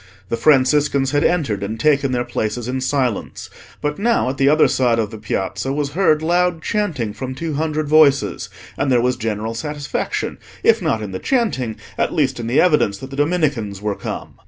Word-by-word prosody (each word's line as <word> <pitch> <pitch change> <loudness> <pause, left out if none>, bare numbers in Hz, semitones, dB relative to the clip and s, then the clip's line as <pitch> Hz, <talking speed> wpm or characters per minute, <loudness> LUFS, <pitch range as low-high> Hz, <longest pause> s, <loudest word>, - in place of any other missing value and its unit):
The - - 0
Franciscans 140 +1 +3
had 145 0 +2
entered 140 - +1
and 110 +3 -4
taken 140 -3 +2
their 120 -1 0
places 120 0 -3
in 130 +1 -2
silence. 130 -4 -2 0.3
But 150 +3 -2
now, 230 - +2
at 135 - -4
the 135 0 +4
other 155 0 +5
side 130 -3 +2
of 110 -3 -1
the 110 - -8
Piazza 95 +3 -3
was 140 0 -2
heard 155 -2 +2
loud 175 0 +1
chanting 155 - -1
from 130 +4 -6
two 160 +2 -4
hundred 155 0 -1
voices, 140 - +3 0.3
and 135 - 0
there 125 - +4
was 125 +1 +1
general 110 -1 -3
satisfaction, 145 +3 -3 0.2
if - - +4
not 110 -1 0
in 100 - -6
the 95 - -4
chanting, 200 - 0 0.2
at - - 0
least 135 -6 +1
in 115 - -4
the 120 - +2
evidence 150 - +3
that 130 +6 -9
the - - -6
Dominicans 145 - 0
were 105 0 -2
come. - - -6
135 Hz, 195 wpm, -19 LUFS, 115-150 Hz, 0.3 s, other